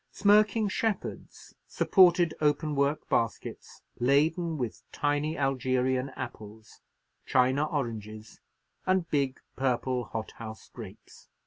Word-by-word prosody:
Smirking 210 +1 +3
shepherds 210 0 -4
supported 175 -3 +4
open 150 +1 +1
work 140 +1 0
baskets, 115 -1 -3 0.2
laden 155 +6 +2
with 120 -5 -4
tiny 145 +2 -1
Algerian 130 -1 0
apples, 110 +1 -9 0.5
China 130 +3 +3
oranges, 110 -6 -5 0.5
and 185 -2 +2
big 140 -3 0 0.2
purple 125 -1 0
hothouse 110 0 -7
grapes. - - -12
140 Hz, 95 wpm, -29 LUFS, 125-160 Hz, 0.5 s, supported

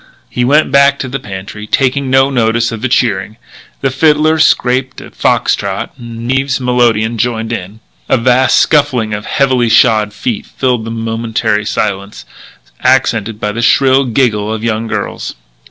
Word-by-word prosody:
He 125 - -1
went 145 +5 +2
back 140 0 +4
to 130 - -4
the 135 +2 -4
pantry, 100 -1 -8
taking 135 +3 0
no 135 +1 +3
notice 115 -2 +1
of 115 -2 -6
the 130 - -1
cheering. 110 -4 0 0.4
The 135 - 0
fiddler 155 +3 +2
scraped 130 -2 +1
a - - -12
fox - - +1
trot, - - -4
and 120 0 -6
Eve's 135 0 0
melodeon 120 -3 +1
joined 115 0 -1
in. 105 +1 -7 0.3
A - - +3
vast 130 +2 +3
scuffling 135 -8 +2
of 105 0 -5
heavily 130 -4 +1
shod 110 -2 +3
feet 105 +1 -4
filled 125 -4 -1
the - - -5
momentary 115 -1 -2
silence, 100 -1 -3 0.6
accented 115 -4 +1
by 105 - -2
the 115 +3 -4
shrill 135 +2 +3
giggle 110 -4 0
of 110 0 -4
young 115 0 -1
girls. - - -4
120 Hz, 160 wpm, -13 LUFS, 110-130 Hz, 0.6 s, back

